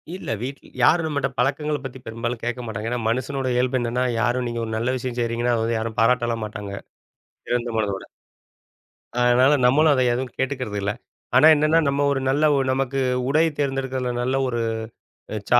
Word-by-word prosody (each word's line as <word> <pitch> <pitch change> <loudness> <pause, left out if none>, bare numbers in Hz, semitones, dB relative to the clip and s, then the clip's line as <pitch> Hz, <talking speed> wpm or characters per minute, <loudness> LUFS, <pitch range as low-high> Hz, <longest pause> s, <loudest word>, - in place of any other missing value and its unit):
இல்லை, 185 - -4
வீட் 135 +3 -5 0.2
யாரும் 160 +5 +4
நம்ம 150 -2 -3
கிட்ட 135 -1 0
பழக்கங்களைப் 145 +2 0
பத்தி 130 0 -7
பெரும்பாலும் 115 +1 -4
கேட்க 120 +1 -2
மாட்டாங்க. 110 0 -4
ஏன்னா 125 - -1
மனுஷனோட 130 +3 -2
இயல்பு 125 +1 +1
என்னென்னா, 120 +2 -1 0.2
யாரும் 125 0 0
நீங்க 120 0 -3
ஒரு 110 - -6
நல்ல 120 +3 0
விஷயம் 125 -1 -5
செய்கிறீங்கன்னா 120 +1 0
அதை 110 - 0
வந்து 115 0 0
யாரும் 110 0 -4
பாராட்டலாம் 120 -1 +2
மாட்டாங்க. 105 -1 -7 0.7
திறந்த 120 0 -1
மனதோட. 100 -3 -2 1.1
அதனால் 125 +3 +5
நம்மளும் 150 +4 +5
அதை 130 - +2
எதுவும் 125 +1 -3
கேட்டுக்கிறது 130 -6 -2
இல்ல. 100 +1 0 0.4
ஆனா 150 +5 +8
என்னன்னா 155 +2 +3
நம்ம 140 +1 +1
ஒரு 140 - 0
நல்ல 145 +3 +2 0.3
நமக்கு 135 +1 -1 0.3
உடை 155 +3 +4
தேர்ந்தெடுக்கிறதில 135 -3 -1
நல்ல 130 +2 0
ஒரு 120 -1 -2 0.9
சா 120 - +6
125 Hz, 170 wpm, -23 LUFS, 120-135 Hz, 1.1 s, ஆனா